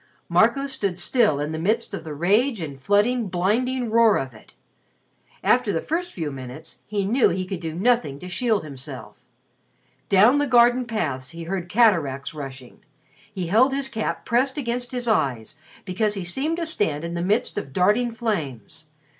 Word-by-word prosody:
Marco 275 0 +3
stood 205 -10 -1
still 210 - +2
in 150 +1 -2
the 160 - -4
midst 210 +8 0
of - - -5
the 155 -3 -7
rage 210 - +2
and 140 -5 -7
flooding, 210 - +2
blinding 225 +7 0
roar 230 -2 +5
of 130 -2 -4
it. 110 - -18 0.9
After 250 -4 +3
the 165 - 0
first 350 - -3
few 160 -4 -4
minutes 135 +4 -8
he 205 -2 -1
knew 240 +6 +3
he 185 +2 -2
could 185 -1 -5
do 160 -2 -5
nothing 225 - +1
to 180 - -9
shield 215 +2 0
himself. 135 -4 -8 0.9
Down 215 +9 +5
the 290 - +1
garden 245 0 +4
paths 150 - -3
he 170 0 -8
heard 175 0 -4
cataracts 165 - +2
rushing. 135 -4 -9 0.5
He 190 -4 -4
held 230 +10 +3
his 275 0 -1
cap 220 -4 -3
pressed 260 +3 +1
against 245 -2 -3
his 245 -1 -3
eyes 130 - 0 0.3
because 205 +3 0
he 195 - -4
seemed 280 - -1
to 340 - -2
stand 165 - -1
in 170 0 -4
the 170 - -2
midst 210 +7 0
of 135 - -9
darting 210 - +2
flames. 160 - -4
200 Hz, 175 wpm, -23 LUFS, 160-240 Hz, 0.9 s, roar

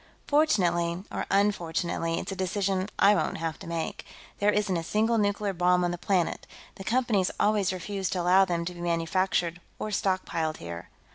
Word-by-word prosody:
Fortunately, 175 - +2
or - - -3
unfortunately, 170 -4 0
it's 190 - -4
a - - -3
decision 190 +1 -1
I 205 - +6
won't - - 0
have 165 -1 -3
to - - -10
make. 165 -1 -3 0.4
There 205 - +3
isn't 210 -3 0
a 165 - 0
single 220 +5 +1
nuclear 205 -1 0
bomb 180 0 +3
on 175 - +1
the 175 - -3
planet. 180 -4 0 0.3
The 195 - -7
Company's 220 -4 +1
always 205 -3 +2
refused 190 +1 -3
to 180 - -1
allow 185 +2 +5
them 170 -2 -1
to 180 - -4
be 175 - -10
manufactured 175 +1 0 0.2
or 215 - -4
stockpiled 185 -5 -1
here." 85 0 -8
185 Hz, 180 wpm, -27 LUFS, 170-200 Hz, 0.4 s, I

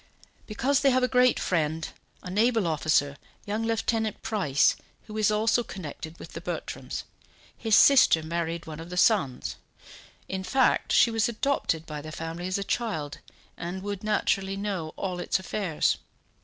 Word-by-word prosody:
"Because 260 +6 +1
they 275 - +4
have 255 -1 +2
a - - +4
great 250 -1 +4
friend, 160 -2 0 0.4
a 180 - -6
naval 225 +1 +2
officer, 150 -3 +1 0.3
young 210 +2 -2
Lieutenant 225 -1 -1
Price, 155 -11 +2 0.3
who 215 - -9
is 215 -1 +3
also 220 +3 +2
connected 160 -4 -8
with - - -11
the - - -6
Bertrams; - - -5 0.5
his 225 -3 +2
sister 250 - +6
married 170 +1 -3
one 155 -1 -8
of 165 +1 -8
the 180 - -6
sons. 130 - +2 0.7
In 190 0 -4
fact, 260 +6 +2
she 235 - +5
was 225 0 +1
adopted 230 - -1
by 150 -2 -6
the 155 +1 -8
family 165 +3 -5
as 185 - -1
a 200 - -2
child, 190 -11 -3 0.4
and 180 +2 -5
would 205 -1 -4
naturally 195 -2 0
know 195 -6 -3
all 185 -2 -3
its - - 0
affairs. 190 -3 -1
190 Hz, 160 wpm, -27 LUFS, 160-225 Hz, 0.7 s, sister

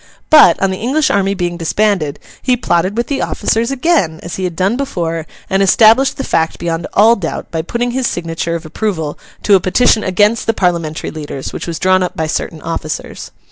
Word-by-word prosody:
But, 310 -1 +7
on 195 -1 +1
the 190 - -4
English 290 +7 +1
army 195 0 +1
being 175 -2 -2
disbanded, 170 -3 0 0.2
he 250 -1 +1
plotted 185 -2 0
with 235 - +1
the 280 +1 -2
officers 230 +2 0
again, 270 - +1
as 170 - -6
he 190 - -2
had 175 -2 -4
done 190 +6 +1
before, 170 - -3 0.2
and 195 +1 +1
established 225 +6 +4
the 270 - -3
fact 165 -7 0
beyond 165 -1 -3
all 225 +3 +5
doubt 170 -7 -5
by 160 - -1
putting 240 +8 -2
his 255 0 -1
signature 170 0 -3
of 165 0 -6
approval 160 -3 -3 0.2
to 205 - +3
a 195 - +7
petition 215 +4 +2
against 205 +4 +1
the 225 - +1
Parliamentary 170 -5 -1
leaders, 145 -3 -6
which - - -6
was 165 -1 -3
drawn 185 +1 +2
up 180 - -3
by 160 - 0
certain 155 0 -4
officers. 160 -2 -5
185 Hz, 200 wpm, -15 LUFS, 165-230 Hz, 0.2 s, But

